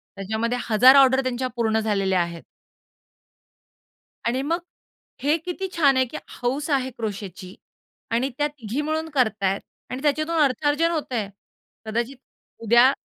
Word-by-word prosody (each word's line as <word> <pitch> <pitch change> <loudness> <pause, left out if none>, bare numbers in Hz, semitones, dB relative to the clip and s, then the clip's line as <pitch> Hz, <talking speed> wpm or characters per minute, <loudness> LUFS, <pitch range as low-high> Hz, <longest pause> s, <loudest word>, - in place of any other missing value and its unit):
त्याच्यामध्ये 220 +5 -2
1000 250 +5 +7
ऑर्डर 265 -1 +6
त्यांच्या 255 0 -1
पूर्ण 220 -2 +1
झालेल्या 195 -4 +1
आहेत. 170 -1 -5 1.8
आणि 255 +3 +1
मग 330 +4 0 0.6
हे 295 +3 +3
किती 375 +2 -4
छान 280 -5 +4
आहे, 260 - +4
की - - -8 0.3
हौस 275 +5 -1
आहे 260 -2 +1
क्रोशेची 200 -5 -6 0.6
आणि 245 +4 +1
त्या 295 - +2
तिघी 260 -3 -5
मिळून 315 +1 -2
करत 220 -6 +1
आहेत 195 +1 +1 0.3
आणि 255 +1 -5
त्याच्यातून 310 +3 +1
अर्थाजन 290 +4 +2
होतं 305 -6 -3
आहे. 210 -4 -2 0.6
कदाचित 235 +4 -2 0.5
उद्या 240 +4 +6
255 Hz, 140 wpm, -24 LUFS, 220-285 Hz, 1.8 s, 1000